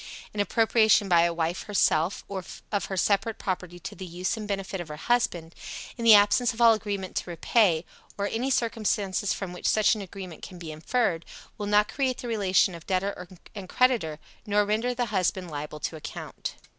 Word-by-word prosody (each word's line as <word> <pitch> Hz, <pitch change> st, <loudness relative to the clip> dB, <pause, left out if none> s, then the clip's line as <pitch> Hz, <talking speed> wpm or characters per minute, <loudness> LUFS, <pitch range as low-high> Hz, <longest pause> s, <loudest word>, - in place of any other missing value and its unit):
An 210 Hz, -, -5 dB
appropriation 220 Hz, 0 st, +4 dB
by 175 Hz, -2 st, +5 dB
a 170 Hz, -, +1 dB
wife, 170 Hz, +1 st, -2 dB
herself, 185 Hz, -4 st, +1 dB
of 195 Hz, +2 st, -4 dB
her 190 Hz, -, -4 dB
separate 200 Hz, +4 st, +1 dB
property 180 Hz, -2 st, -4 dB
to 190 Hz, +4 st, -6 dB
the 195 Hz, -, -9 dB
use 180 Hz, +2 st, -2 dB
and 215 Hz, -2 st, -6 dB
benefit 195 Hz, -2 st, -3 dB
of 175 Hz, -, -8 dB
her 150 Hz, -, -6 dB
husband, 175 Hz, -4 st, 0 dB, 0.4 s
in 235 Hz, -, -6 dB
the 225 Hz, -2 st, +9 dB
absence 210 Hz, +4 st, +4 dB
of -, -, -11 dB
all 230 Hz, -1 st, +7 dB
agreement 200 Hz, -3 st, -4 dB
to -, -, -3 dB
repay, 170 Hz, 0 st, +2 dB, 0.3 s
or 200 Hz, -, -1 dB
any 230 Hz, +6 st, -1 dB
circumstances 215 Hz, -5 st, 0 dB
from 190 Hz, -3 st, -3 dB
which 180 Hz, -, -3 dB
such 215 Hz, -1 st, +4 dB
an 215 Hz, -, -4 dB
agreement 185 Hz, -3 st, -8 dB
can 185 Hz, -, -9 dB
be 165 Hz, -2 st, -7 dB
inferred, 165 Hz, +2 st, 0 dB, 0.4 s
will 205 Hz, -, -3 dB
not 210 Hz, 0 st, +4 dB
create 260 Hz, -2 st, -1 dB
the 245 Hz, -, -6 dB
relation 195 Hz, -4 st, +2 dB
of 170 Hz, -1 st, -11 dB
debtor 185 Hz, -1 st, -1 dB, 0.3 s
and 195 Hz, -3 st, -8 dB
creditor, 235 Hz, -12 st, +2 dB, 0.3 s
nor 210 Hz, 0 st, +2 dB
render 225 Hz, +4 st, 0 dB
the 245 Hz, 0 st, 0 dB
husband 185 Hz, -2 st, 0 dB
liable 150 Hz, +1 st, -6 dB
to 160 Hz, -, -3 dB
account. 155 Hz, -, -7 dB
200 Hz, 190 wpm, -27 LUFS, 175-220 Hz, 0.4 s, the